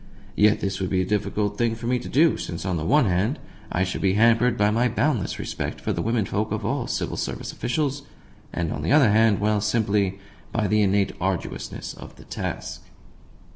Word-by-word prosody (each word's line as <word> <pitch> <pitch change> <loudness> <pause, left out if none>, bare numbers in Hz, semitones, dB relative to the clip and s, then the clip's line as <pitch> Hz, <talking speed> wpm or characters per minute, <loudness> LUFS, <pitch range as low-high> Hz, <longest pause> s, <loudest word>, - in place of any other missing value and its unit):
Yet 105 +1 +4
this 95 -1 -2
would 95 - -1
be 95 -1 +1
a - - -3
difficult 105 +1 -1
thing 115 -1 +1
for 115 - -8
me 125 +1 +1
to - - -8
do, 155 +3 +4
since, 85 +1 -5
on 95 -2 0
the 80 - -3
one 145 - +4
hand, 100 - +1 0.3
I 90 - +1
should 90 - -3
be 95 -1 +2
hampered 115 +2 +4
by 105 0 +3
my 120 +3 +2
boundless 120 - 0
respect - - -4
for - - -2
the 85 - -2
womenfolk 110 0 -1
of 105 -1 -2
all 125 +2 -1
Civil - - -2
Service - - -4
officials, 140 +2 -1 0.5
and, 85 -2 -2
on - - -4
the - - -1
other 140 -8 +6
hand 110 -1 +4
well, 105 0 +1
simply 105 -3 +1 0.3
by 110 -2 0
the 105 +2 +3
innate 100 0 +2
arduousness 95 -1 -3
of - - -12
the - - -14
task. - - -5
105 Hz, 205 wpm, -24 LUFS, 95-120 Hz, 0.5 s, other